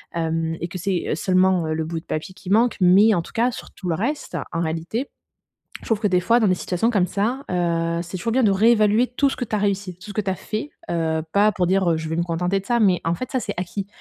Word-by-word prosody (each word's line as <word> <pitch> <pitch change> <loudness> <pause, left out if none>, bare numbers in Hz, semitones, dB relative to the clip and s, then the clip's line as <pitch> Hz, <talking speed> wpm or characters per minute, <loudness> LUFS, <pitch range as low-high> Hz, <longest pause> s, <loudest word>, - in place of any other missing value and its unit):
Hem 165 0 -1
et 170 - -2
que 185 - -7
c'est, 190 -1 -1
heu, - - +1
seulement, 185 -1 +2
heu, 155 - -1
le 160 0 -2
bout 165 0 -4
de - - -33
papier 155 +4 -4
qui 185 - -10
manque, 230 +3 +3
mais 200 +5 +6
en 170 - +1
tout - - -13
cas, 240 +2 +2
sur - - -9
tout 185 - -8
le - - +2
reste, 240 - -3 0.2
en 165 - -1
réalité, 165 - -3 0.7
je - - -13
trouve 225 -2 +1
que, 210 - +1
des 180 -1 +2
fois, 235 +6 +3
dans 215 - +3
des 185 - +4
situations 185 +7 0
comme 185 -5 +2
ça, 225 +9 -1
heu, 170 -1 0
c'est 175 +2 -8
toujours 230 +6 -2
bien 260 -1 +3
de 205 - +4
réévaluer 215 +3 +4
tout 275 +3 +1
ce - - -4
que - - -2
tu 215 - -3
as - - 0
réussi, 195 -3 -1
tout 200 +3 -12
ce - - -6
que 215 - 0
tu 195 - -3
as - - -2
fait, 215 +9 -5 0.2
heu, 160 -2 0
pas 210 +1 +4
pour 180 -3 0
dire, 190 -2 +2
heu, 160 - +1
je 160 0 -5
vais 160 - -2
me - - +2
contenter 180 +3 -1
de 195 - -12
ça. 240 +1 +1
Mais 190 -5 +3
en 170 +1 +1
fait, 255 - -6
ça, 260 - 0
c'est 205 - -4
acquis. 190 +2 -4
190 Hz, 290 wpm, -22 LUFS, 170-215 Hz, 0.7 s, mais